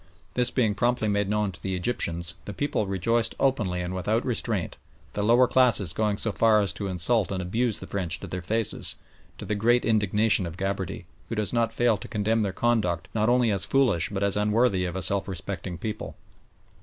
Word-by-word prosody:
This 125 Hz, -1 st, +2 dB
being 115 Hz, -5 st, +1 dB
promptly 120 Hz, 0 st, 0 dB
made 100 Hz, -1 st, 0 dB
known 105 Hz, -1 st, 0 dB
to 85 Hz, -, -13 dB
the 95 Hz, -1 st, -2 dB
Egyptians, 85 Hz, -4 st, -1 dB
the 105 Hz, -, -7 dB
people 145 Hz, -6 st, -1 dB
rejoiced 110 Hz, +5 st, 0 dB
openly 105 Hz, -10 st, 0 dB
and 90 Hz, +1 st, -4 dB
without 105 Hz, +5 st, -1 dB
restraint, 115 Hz, -6 st, -2 dB, 0.4 s
the 105 Hz, -, -2 dB
lower 120 Hz, +4 st, +5 dB
classes 115 Hz, -10 st, +3 dB
going 105 Hz, 0 st, 0 dB
so 110 Hz, -, -1 dB
far 110 Hz, 0 st, +4 dB
as 100 Hz, -3 st, 0 dB
to 100 Hz, -, -4 dB
insult 95 Hz, +3 st, +1 dB
and 95 Hz, -, -2 dB
abuse 110 Hz, +5 st, -1 dB
the -, -, -8 dB
French 90 Hz, -4 st, -2 dB
to -, -, -6 dB
their 90 Hz, -, -5 dB
faces, 110 Hz, +4 st, -1 dB, 0.4 s
to -, -, -8 dB
the 105 Hz, -, -2 dB
great 120 Hz, +4 st, +2 dB
indignation 105 Hz, -2 st, +2 dB
of 85 Hz, +1 st, -8 dB
Gabarty, 95 Hz, -2 st, -3 dB, 0.2 s
who 115 Hz, -, -3 dB
does 105 Hz, 0 st, -1 dB
not 115 Hz, -1 st, +1 dB
fail 120 Hz, -3 st, +2 dB
to 95 Hz, -, -9 dB
condemn 110 Hz, +2 st, 0 dB
their 100 Hz, -2 st, 0 dB
conduct 95 Hz, -6 st, 0 dB
not 110 Hz, +1 st, +1 dB
only 120 Hz, -2 st, +3 dB
as 100 Hz, -2 st, +1 dB
foolish 120 Hz, -12 st, +2 dB
but 100 Hz, -1 st, -3 dB
as 100 Hz, -1 st, +2 dB
unworthy 105 Hz, -2 st, +2 dB
of 90 Hz, 0 st, -4 dB
a 95 Hz, -, -1 dB
self 100 Hz, +4 st, +1 dB
respecting 95 Hz, -1 st, -5 dB
people. 110 Hz, +4 st, -5 dB
105 Hz, 205 wpm, -26 LUFS, 95-115 Hz, 0.4 s, lower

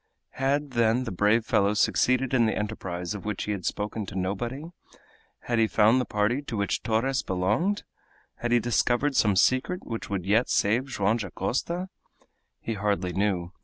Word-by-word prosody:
Had, 140 Hz, +2 st, -1 dB
then, 120 Hz, +1 st, +2 dB
the 115 Hz, -, -5 dB
brave 105 Hz, +5 st, +2 dB
fellow 100 Hz, -1 st, +2 dB
succeeded 130 Hz, +4 st, +2 dB
in 120 Hz, -3 st, +4 dB
the 110 Hz, -, -1 dB
enterprise 95 Hz, -4 st, -4 dB
of 105 Hz, -, -7 dB
which 105 Hz, -2 st, -3 dB
he 105 Hz, -, -3 dB
had 100 Hz, -3 st, -3 dB
spoken 105 Hz, 0 st, -3 dB
to -, -, -8 dB
nobody? 110 Hz, +9 st, -3 dB, 0.8 s
Had 120 Hz, -1 st, -1 dB
he 110 Hz, -, +4 dB
found 110 Hz, +4 st, +4 dB
the -, -, -3 dB
party 105 Hz, +6 st, 0 dB
to 120 Hz, -6 st, -5 dB
which 100 Hz, 0 st, -1 dB
Torres 125 Hz, +4 st, 0 dB
belonged? 105 Hz, -, 0 dB, 0.5 s
Had 120 Hz, -, -3 dB
he 120 Hz, -, +5 dB
discovered 120 Hz, +4 st, +1 dB
some 105 Hz, -5 st, +3 dB
secret 130 Hz, -, +2 dB
which 115 Hz, -1 st, -5 dB
would 95 Hz, -3 st, -3 dB
yet 110 Hz, +5 st, +2 dB
save 115 Hz, +6 st, +2 dB
Joam 105 Hz, -3 st, +1 dB
Dacosta? 125 Hz, -, -3 dB, 0.7 s
He 115 Hz, -, -4 dB
hardly 100 Hz, -3 st, -1 dB
knew. 95 Hz, -2 st, -1 dB
110 Hz, 170 wpm, -26 LUFS, 100-125 Hz, 0.8 s, he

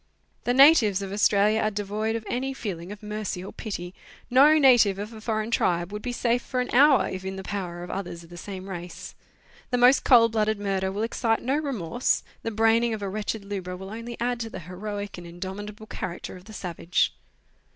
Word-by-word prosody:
The 245 Hz, -, +2 dB
natives 250 Hz, -, +6 dB
of 195 Hz, -, -6 dB
Australia 210 Hz, +1 st, +3 dB
are 215 Hz, -, +2 dB
devoid 210 Hz, +2 st, -2 dB
of 225 Hz, -1 st, -4 dB
any 265 Hz, +2 st, -2 dB
feeling 185 Hz, -7 st, -5 dB
of 205 Hz, +1 st, -10 dB
mercy 210 Hz, -3 st, -4 dB
or -, -, -8 dB
pity; 180 Hz, -5 st, -6 dB, 0.4 s
no 290 Hz, +5 st, +7 dB
native 245 Hz, -9 st, +5 dB
of 210 Hz, +3 st, -6 dB
a 220 Hz, -, -10 dB
foreign 215 Hz, 0 st, -2 dB
tribe 175 Hz, -4 st, +1 dB
would 210 Hz, -, -4 dB
be 245 Hz, -, -3 dB
safe 245 Hz, 0 st, +1 dB
for 255 Hz, -, -3 dB
an 250 Hz, -, -2 dB
hour 275 Hz, +2 st, +6 dB
if 185 Hz, 0 st, -5 dB
in 190 Hz, 0 st, -4 dB
the 190 Hz, -, -6 dB
power 180 Hz, -4 st, -4 dB
of 180 Hz, -, -7 dB
others 175 Hz, -3 st, -5 dB
of 165 Hz, -, -17 dB
the -, -, -9 dB
same 190 Hz, +1 st, -7 dB
race. 175 Hz, -2 st, -7 dB, 0.6 s
The 245 Hz, -, +1 dB
most 250 Hz, +2 st, +5 dB
cold 230 Hz, -3 st, +6 dB
blooded 215 Hz, -1 st, +1 dB
murder 195 Hz, -2 st, -1 dB
will 205 Hz, +3 st, -2 dB
excite 225 Hz, 0 st, 0 dB
no 265 Hz, +3 st, +1 dB
remorse; 245 Hz, -, -1 dB, 0.2 s
the -, -, -2 dB
braining 225 Hz, +1 st, +2 dB
of 210 Hz, -, -7 dB
a 195 Hz, -, -2 dB
wretched 210 Hz, +1 st, -3 dB
lubra 185 Hz, -3 st, -5 dB
will 190 Hz, +1 st, -8 dB
only 230 Hz, +1 st, -7 dB
add 245 Hz, 0 st, -1 dB
to 225 Hz, -1 st, -4 dB
the 185 Hz, -, -7 dB
heroic 200 Hz, +3 st, -6 dB
and 175 Hz, -, -10 dB
indomitable 200 Hz, +5 st, -7 dB
character 180 Hz, -3 st, -6 dB
of 180 Hz, 0 st, -13 dB
the 215 Hz, -, -12 dB
savage. 180 Hz, -2 st, -1 dB
210 Hz, 210 wpm, -26 LUFS, 190-230 Hz, 0.6 s, no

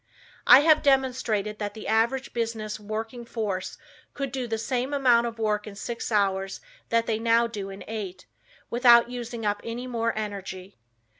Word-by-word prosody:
I 255 Hz, +3 st, +10 dB
have 310 Hz, 0 st, +5 dB
demonstrated 250 Hz, -7 st, +1 dB
that 205 Hz, 0 st, -4 dB
the 220 Hz, -, -8 dB
average 235 Hz, +4 st, +1 dB
business 225 Hz, -2 st, -3 dB
working 220 Hz, +3 st, -5 dB
force 210 Hz, -5 st, -4 dB, 0.4 s
could 275 Hz, -2 st, -3 dB
do 255 Hz, -2 st, -3 dB
the 225 Hz, -1 st, -2 dB
same 255 Hz, +4 st, -2 dB
amount 240 Hz, -4 st, +4 dB
of 230 Hz, -1 st, -6 dB
work 215 Hz, -1 st, -1 dB
in 205 Hz, -, -8 dB
six 235 Hz, +3 st, -5 dB
hours 195 Hz, -2 st, 0 dB, 0.3 s
that 230 Hz, 0 st, +2 dB
they 220 Hz, -1 st, -1 dB
now 230 Hz, +1 st, +3 dB
do 205 Hz, -4 st, -5 dB
in 195 Hz, 0 st, -9 dB
eight, 205 Hz, -4 st, -6 dB, 0.5 s
without 240 Hz, 0 st, +6 dB
using 240 Hz, -2 st, -5 dB
up 205 Hz, 0 st, 0 dB
any 235 Hz, +2 st, -5 dB
more 230 Hz, -2 st, -1 dB
energy. 195 Hz, -, -6 dB
225 Hz, 165 wpm, -26 LUFS, 210-240 Hz, 0.5 s, I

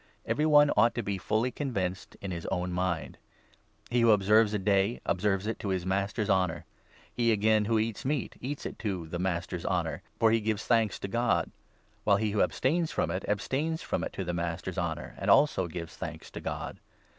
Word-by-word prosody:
Every 150 Hz, +2 st, +1 dB
one 145 Hz, -1 st, +6 dB
ought 115 Hz, -, +4 dB
to 120 Hz, -, -1 dB
be 100 Hz, -1 st, -2 dB
fully 110 Hz, +6 st, 0 dB
convinced 95 Hz, -10 st, -3 dB
in 100 Hz, -, -4 dB
his 85 Hz, -2 st, -5 dB
own 90 Hz, -1 st, -1 dB
mind. 90 Hz, -2 st, -2 dB, 0.7 s
He 120 Hz, 0 st, +3 dB
who 115 Hz, -, +5 dB
6 110 Hz, -, +8 dB
observes 105 Hz, +2 st, +4 dB
a -, -, +2 dB
day, 100 Hz, +3 st, +2 dB
observes 95 Hz, +1 st, +1 dB
it 110 Hz, -, -3 dB
to 95 Hz, -4 st, -1 dB
the 90 Hz, -, -7 dB
Master's 100 Hz, +3 st, -1 dB
honour. 90 Hz, -4 st, +1 dB, 0.5 s
He, 120 Hz, -1 st, +2 dB
again, 110 Hz, 0 st, +3 dB
who 115 Hz, +1 st, +2 dB
eats 110 Hz, -1 st, -1 dB
meat 140 Hz, 0 st, -2 dB
eats 140 Hz, +3 st, -4 dB
it -, -, -6 dB
to 95 Hz, -6 st, -3 dB
the 85 Hz, +2 st, -4 dB
Master's 90 Hz, -1 st, -2 dB
honour, -, -, -1 dB, 0.2 s
for 115 Hz, -1 st, +4 dB
he 115 Hz, -, +3 dB
gives 110 Hz, -1 st, -1 dB
thanks 115 Hz, -4 st, +2 dB
to -, -, -3 dB
God; 120 Hz, +4 st, +1 dB, 0.5 s
while 100 Hz, -1 st, +4 dB
he 105 Hz, 0 st, 0 dB
who 105 Hz, -, +1 dB
abstains 160 Hz, +5 st, +1 dB
from 85 Hz, -, 0 dB
it 90 Hz, +2 st, -3 dB
abstains 145 Hz, +10 st, -1 dB
from -, -, -2 dB
it -, -, -3 dB
to 95 Hz, -, -3 dB
the 90 Hz, -1 st, -3 dB
Master's 85 Hz, +2 st, -3 dB
honour, 85 Hz, -2 st, -3 dB
and -, -, -2 dB
also 140 Hz, -11 st, +4 dB
gives 85 Hz, 0 st, -7 dB
thanks -, -, -7 dB
to -, -, -7 dB
God. -, -, -5 dB
105 Hz, 205 wpm, -29 LUFS, 95-115 Hz, 0.7 s, 6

